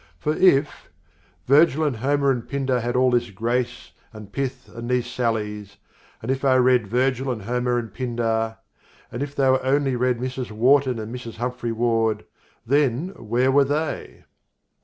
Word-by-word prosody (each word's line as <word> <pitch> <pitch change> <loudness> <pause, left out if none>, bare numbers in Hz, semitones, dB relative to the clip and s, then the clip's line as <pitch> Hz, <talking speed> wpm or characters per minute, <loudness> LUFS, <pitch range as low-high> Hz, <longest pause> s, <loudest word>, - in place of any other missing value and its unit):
For 150 - -1
if: 150 -4 +2 0.6
Virgil 150 +2 +4
and 145 -6 0
Homer 140 +3 +2
and 120 -3 -3
Pindar 135 -2 0
had 120 +1 -2
all 130 0 +3
this 120 -1 +1
grace, 120 +5 -2 0.2
and 105 -2 -11
pith 135 0 -4
and 115 +1 -7
these 125 -1 +1
sallies, 105 -5 -3 0.5
And 120 - -1
if 135 +1 -2
I 135 -2 +4
read 125 -3 +3
Virgil 130 +3 0
and 110 -5 -5
Homer 125 +2 0
and 115 -2 -4
Pindar, 115 -3 -1 0.5
And 120 - -5
if 145 0 -4
they 135 - +2
only 130 +1 +2
read 125 0 +1
Mrs. 130 0 -4
Wharton 130 +3 +3
and 110 +1 -6
Mrs. 120 -2 -7
Humphrey 125 0 -3
Ward 115 -1 0 0.4
Then 140 +4 +1
where 125 - 0
were 140 +1 +5
they? 150 +2 -3
125 Hz, 160 wpm, -23 LUFS, 115-135 Hz, 0.6 s, were